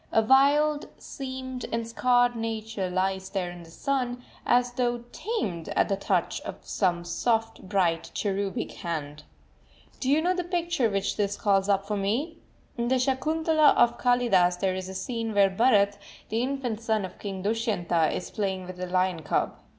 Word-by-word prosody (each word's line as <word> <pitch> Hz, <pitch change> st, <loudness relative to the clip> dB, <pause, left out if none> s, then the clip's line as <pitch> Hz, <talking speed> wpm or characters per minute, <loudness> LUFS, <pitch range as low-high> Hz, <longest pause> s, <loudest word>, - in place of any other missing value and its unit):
A 225 Hz, -, +4 dB
wild, 290 Hz, +5 st, +4 dB
seamed, 260 Hz, -2 st, -6 dB
and 230 Hz, 0 st, -2 dB
scarred 245 Hz, +1 st, +3 dB
nature 225 Hz, -3 st, -3 dB
lies 190 Hz, +1 st, -1 dB
there 185 Hz, -3 st, -2 dB
in 175 Hz, 0 st, -10 dB
the 165 Hz, -, -13 dB
sun, 250 Hz, -, -2 dB, 0.2 s
as 245 Hz, 0 st, +3 dB
though 245 Hz, -1 st, -1 dB
tamed 205 Hz, -, -3 dB
at -, -, +2 dB
the 200 Hz, -, +2 dB
touch 195 Hz, -, -1 dB
of -, -, -6 dB
some 175 Hz, -3 st, 0 dB
soft, 225 Hz, +4 st, 0 dB
bright, 170 Hz, -4 st, +1 dB
cherubic 200 Hz, +2 st, -2 dB
hand. 150 Hz, -4 st, -5 dB, 0.7 s
Do 260 Hz, -, -1 dB
you 290 Hz, +3 st, +4 dB
know 355 Hz, +3 st, +2 dB
the 360 Hz, -1 st, -2 dB
picture 345 Hz, -7 st, 0 dB
which 195 Hz, -1 st, -1 dB
this 205 Hz, -1 st, 0 dB
calls 195 Hz, -1 st, +2 dB
up 195 Hz, 0 st, +2 dB
for 210 Hz, 0 st, -2 dB
me? 245 Hz, -, -1 dB, 0.4 s
In 235 Hz, -, 0 dB
the 260 Hz, +1 st, +3 dB
Sakuntala 310 Hz, +4 st, +3 dB
of 240 Hz, -, +3 dB
Kalidas 200 Hz, -8 st, +3 dB
there 190 Hz, 0 st, +1 dB
is 185 Hz, 0 st, -5 dB
a 190 Hz, -, -7 dB
scene 230 Hz, 0 st, -3 dB
where 200 Hz, -1 st, +5 dB
Bharat, 205 Hz, -2 st, +3 dB, 0.3 s
the 225 Hz, +2 st, 0 dB
infant 250 Hz, -4 st, -2 dB
son 220 Hz, -3 st, 0 dB
of 185 Hz, -, -11 dB
King 195 Hz, -2 st, -5 dB
Dushyanta, 200 Hz, -7 st, +1 dB
is 180 Hz, -, -4 dB
playing 190 Hz, -3 st, -2 dB
with 180 Hz, 0 st, -9 dB
a 185 Hz, -, -3 dB
lion 185 Hz, -2 st, +1 dB
cub. 150 Hz, -, 0 dB
220 Hz, 175 wpm, -27 LUFS, 190-250 Hz, 0.7 s, where